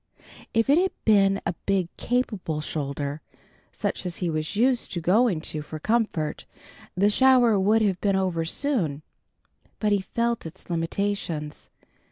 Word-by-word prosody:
If 225 0 +2
it 285 +4 +5
had 380 +1 +1
been 195 -2 +4
a - - 0
big 195 -3 +2
capable 210 -10 -1
shoulder, 145 -1 -4 0.5
such - - -3
as 180 -2 -4
he 175 -3 -1
was 155 +4 -3
used 245 +2 +2
to 175 - -1
going 185 +1 +2
to 155 -1 -3
for 155 +1 -7
comfort, 170 -5 -1 0.5
the 200 +3 +3
shower 245 -3 +5
would 215 +3 +3
have 190 -4 0
been 200 -2 +2
over 185 -4 0
soon. 165 - -1 0.7
But 210 -1 0
he 200 -1 +2
felt 235 0 -2
its 160 - -11
limitations. 165 -3 -3
195 Hz, 150 wpm, -25 LUFS, 160-225 Hz, 0.7 s, it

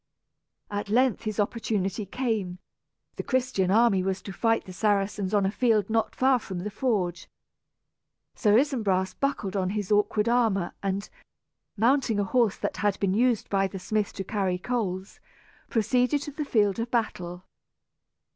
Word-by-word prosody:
At 205 0 -3
length 245 +1 +2
his 215 0 -3
opportunity 205 -2 -1
came. 215 -6 -2 0.6
The - - -1
Christian 255 -8 0
army 210 -2 +4
was 190 0 -2
to 195 - -7
fight 225 +2 +1
the 185 - -9
Saracens 200 0 0
on 205 -2 +2
a 195 - +1
field 220 -3 +1
not 225 0 0
far 260 -1 +3
from 190 -5 -6
the 210 - -4
forge. 190 -8 -1 1.0
Sir 210 -1 +3
Isumbras 215 -9 +1
buckled 230 -8 -2
on 185 -2 0
his 205 0 -3
awkward 210 +1 +2
armor 225 -7 +1
and, 195 0 -2 0.7
mounting 235 -1 +2
a - - +2
horse 225 +1 +2
that - - -3
had 205 -2 0
been 195 -2 +1
used 235 +1 +2
by 195 -1 +2
the 190 - -7
smith 210 +3 -1
to 195 - -4
carry 190 -2 -1
coals, 190 -3 -3 0.5
proceeded 250 +5 +1
to 295 - -6
the 300 +1 -4
field 210 -5 +2
of 230 +1 -2
battle. 180 -7 -2
210 Hz, 155 wpm, -27 LUFS, 195-235 Hz, 1.0 s, army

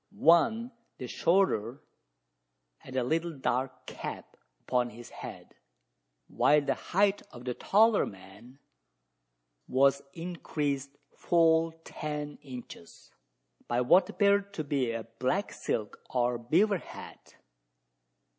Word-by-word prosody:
One, 225 +9 +4 0.3
the 125 - -6
shorter, 140 - +1 1.0
had 130 - -11
a 130 - +1
little 160 +4 -1
dark 130 0 -2
cap - - -7 0.3
upon 125 -1 0
his 120 +1 -12
head; - - -9 0.7
while 150 +1 +4
the 140 - 0
height 200 +2 +1
of 120 0 -11
the 125 - -1
taller 215 - +3
man 100 +7 -13 1.1
was 140 +1 +3
increased 145 -5 -3 0.2
full 165 -1 +3
ten 150 -2 -5
inches, 125 -10 -11 0.6
by 120 +1 +1
what 150 +10 +5
appeared 200 0 +2
to 155 - -2
be 140 -4 0
a 115 -1 -4 0.2
black 180 - 0
silk 105 -2 -3
or 120 -1 0
beaver 180 - +2
hat. - - -12
145 Hz, 110 wpm, -30 LUFS, 125-175 Hz, 1.1 s, what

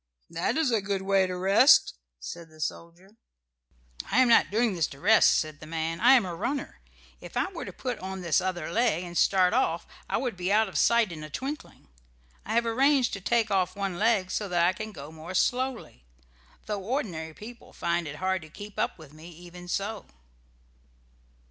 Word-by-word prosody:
"That 165 - -1
is 315 -6 +2
a 225 -3 +2
good 195 0 -2
way 195 -1 +3
to 180 0 -4
rest," 195 +9 +5 0.3
said 170 - -8
the 155 0 -19
soldier. 170 +6 -7 0.9
"I 210 - 0
am 255 - +4
not 230 - +5
doing 225 +1 +1
this 170 -4 0
to 135 - -12
rest," 220 +8 +5
said 155 -2 -3
the 155 - -11
man. 165 +1 -3
"I 250 +3 +6
am 245 -7 +5
a 180 - -5
runner. 275 +11 -4 0.4
If - - -9
I 380 - 0
were 350 - -6
to - - -7
put 250 -3 -5
on 190 0 -6
this 170 +1 +2
other 175 -3 -3
leg 220 -5 +1
and 175 -1 -8
start 185 +1 +3
off 175 -9 +1 0.2
I - - +1
would 245 -3 -2
be 180 +1 -2
out 220 +1 +4
of 190 - -11
sight 235 -5 +3
in 155 -2 -8
a 155 - -8
twinkling. 275 - -7 0.6
I 220 - -2
have 235 0 +3
arranged 260 +2 +2
to 195 - -5
take 230 +2 +1
off 185 -2 +1
one 195 -3 -3
leg 210 -4 +2
so 205 -2 -2
that 175 -1 +2
I 180 - +3
can 215 +2 -6
go 145 -5 -10
more 160 +3 -9
slowly; 250 - -1 0.6
though 210 -2 -3
ordinary 180 - -3
people 235 +3 -12
find 170 -1 -2
it 150 - -6
hard 185 +3 -1
to 155 - -12
keep 205 +5 -10
up - - -1
with 155 -3 -14
me 155 +3 -12
even 175 +1 -12
so." 200 +4 -3
190 Hz, 205 wpm, -27 LUFS, 170-225 Hz, 0.9 s, I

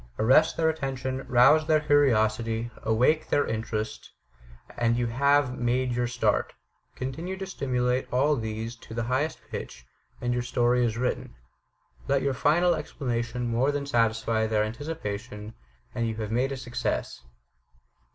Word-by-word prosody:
Arrest 130 +8 +4
their 160 - +2
attention, 135 -4 -2
rouse 135 +6 +5
their 155 -1 +4
curiosity, 115 -5 +2
awake 125 +8 +2
their 145 - +2
interest, 110 -1 -4 0.7
and 120 0 +1
you 120 - +1
have 140 +2 +2
made 125 +1 +1
your 120 0 0
start. 120 0 0 0.4
Continue 160 +9 -4
to 195 - -5
stimulate 125 -7 -1
all 140 +4 +3
these 110 -1 -4
to 110 - -11
the 120 - -1
highest 130 +6 -1
pitch, - - -7 0.3
and 120 0 -1
your 125 - 0
story 120 0 +2
is 115 -1 0
written. 125 +1 -2 0.7
Let 140 -1 +2
your 140 -1 +1
final 170 +7 +3
explanation 125 -5 -3
more 120 +5 +1
than 145 -1 -3
satisfy 115 -3 +1
their 110 -1 +2
anticipation, 110 -4 -5 0.4
and 115 -2 -1
you 110 - -3
have 110 -1 -4
made 125 +4 +1
a 135 - -3
success. 125 -2 -3
125 Hz, 145 wpm, -27 LUFS, 115-140 Hz, 0.7 s, rouse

